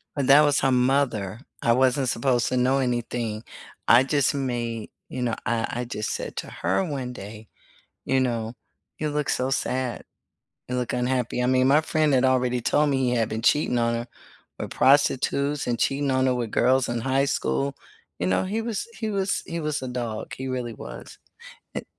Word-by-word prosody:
And 140 -3 -1
that 140 +2 +9
was 145 -1 +3
her 135 - +2
mother. 125 -5 +1 0.2
I 115 - +3
wasn't 130 +1 +2
supposed 120 0 +1
to 130 - 0
know 130 +2 +3
anything. 120 -3 -2 0.4
I 120 +2 +7
just 140 0 +1
made 120 -4 -3 0.2
you 130 - -5
know, 120 -2 0
I 115 -1 0
I - - -4
just 110 -3 -4
said - - -5
to - - -4
her 95 +3 0
one 130 -4 -4
day, 105 0 -10 0.6
you 135 - +2
know, 115 -3 -1 0.4
"You 155 - -2
look 150 -1 -1
so 130 +1 0
sad. 130 -2 -1 0.7
You 125 - -2
look 125 -1 -2
unhappy." 125 -1 0
I - - +1
mean 130 0 +3
my 145 +3 +6
friend 155 -2 +1
had 130 0 +3
already 125 -1 +2
told 145 +5 +2
me 135 - +1
he 130 -2 +1
had 115 -2 +1
been 110 +1 -4
cheating 125 -1 +3
on 115 0 +1
her 115 +1 -3 0.5
with - - -5
prostitutes 140 +1 +2
and 120 -1 -1
cheating 140 0 +1
on 130 0 +2
her 130 - +2
with 120 -3 -2
girls 130 0 +3
in 120 0 -1
high 135 +3 +1
school, 70 - -1 0.4
you 90 - -1
know, 95 - +2
he 205 +4 -2
was 225 - -3
he 220 -2 -2
was 195 -1 0
he 170 -2 -4
was 150 -3 -2
a 130 - -4
dog. 120 -3 -4
He 130 - -5
really 125 -3 -3
was. - - -10 0.6
An - - -3
125 Hz, 195 wpm, -25 LUFS, 115-135 Hz, 0.7 s, that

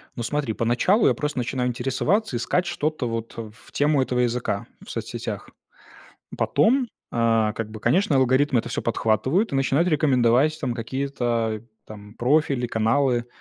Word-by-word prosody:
Ну, 120 - -5
смотри, 140 -1 -1
поначалу 120 - +2
я - - +4
просто 150 -3 -2
начинаю 125 +1 -1
интересоваться, 135 - 0
искать 175 +9 0
что-то 155 -4 -2
вот 115 0 -4
в 110 -1 -10
тему 145 -1 +2
этого 125 -1 -1
языка 120 -4 -1 0.2
в - - -13
соцсетях. - - -5 0.9
Потом, 240 - +2 0.2
а, 115 -2 +2
как 115 -1 -5
бы, 110 - -8
конечно, 170 - +2
алгоритмы 130 +1 +3
это - - -3
всё - - -3
подхватывают 130 - +1
и - - +1
начинают 135 +5 +2
рекомендовать, 140 -1 +3
там, 130 -5 -2
какие-то, 120 -3 -2 0.2
там, 105 0 -11
профили, 135 0 +1
каналы. 120 +2 +1
125 Hz, 150 wpm, -24 LUFS, 115-145 Hz, 0.9 s, я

